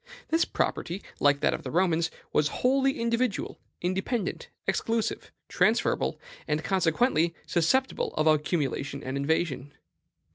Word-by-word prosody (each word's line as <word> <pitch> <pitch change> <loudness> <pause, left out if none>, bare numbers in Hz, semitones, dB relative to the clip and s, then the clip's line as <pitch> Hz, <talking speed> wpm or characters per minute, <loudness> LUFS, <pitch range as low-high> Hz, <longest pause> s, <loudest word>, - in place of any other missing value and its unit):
This 325 +1 +3
property, 180 +4 -2 0.2
like 145 0 +3
that - - +3
of - - -3
the 135 - -6
Romans, 170 0 +2 0.2
was 150 - +3
wholly 270 - +1
individual, 235 -1 -1 0.2
independent, 190 +3 -2 0.2
exclusive, 225 -1 -1 0.2
transferable, - - +1 0.3
and 150 +1 0
consequently 170 0 +2
susceptible 260 +11 +1
of 155 - +1
accumulation 145 -3 0
and 130 +1 -4
invasion. 145 -1 -1
170 Hz, 115 wpm, -28 LUFS, 150-230 Hz, 0.3 s, This